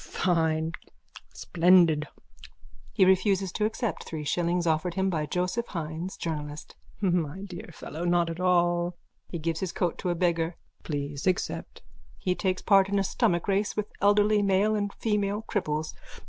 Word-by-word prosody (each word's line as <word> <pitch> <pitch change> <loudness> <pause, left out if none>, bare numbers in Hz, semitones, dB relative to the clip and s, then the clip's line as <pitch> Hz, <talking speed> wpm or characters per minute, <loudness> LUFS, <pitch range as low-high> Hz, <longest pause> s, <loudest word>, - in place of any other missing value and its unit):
_ - - -12
Fine! 160 -2 0 0.6
Splendid! 170 -3 +4 0.8
(He 195 - +4
refuses 190 0 +3
to 210 - 0
accept 225 +1 -2
three 155 -2 -6
shillings 175 +3 0
offered 165 +2 0
him 190 0 +1
by 155 -3 -1
Joseph 180 +9 -1
Hynes, 165 +1 -5
journalist.) 150 -2 -5 0.3
My 180 -2 0
dear 180 -4 -8
fellow, 160 +1 -7
not 175 -1 +2
at 165 - -7
all! 175 -1 +2 0.3
(He 170 - -4
gives 165 0 -2
his 185 -2 -2
coat 175 -3 -1
to 180 - -2
a 175 - +1
beggar.) 170 -1 0 0.3
Please 145 0 -4
accept. 185 0 -2 0.4
_(He 180 -1 +2
takes 185 -1 -1
part 195 -2 +5
in 200 - +1
a 195 - +2
stomach 175 -1 0
race 200 +2 0
with 210 0 -2
elderly 205 +1 +4
male 200 +2 +2
and 205 -1 -1
female 210 -1 -1
cripples.) 155 -8 -2
180 Hz, 160 wpm, -27 LUFS, 165-195 Hz, 0.8 s, part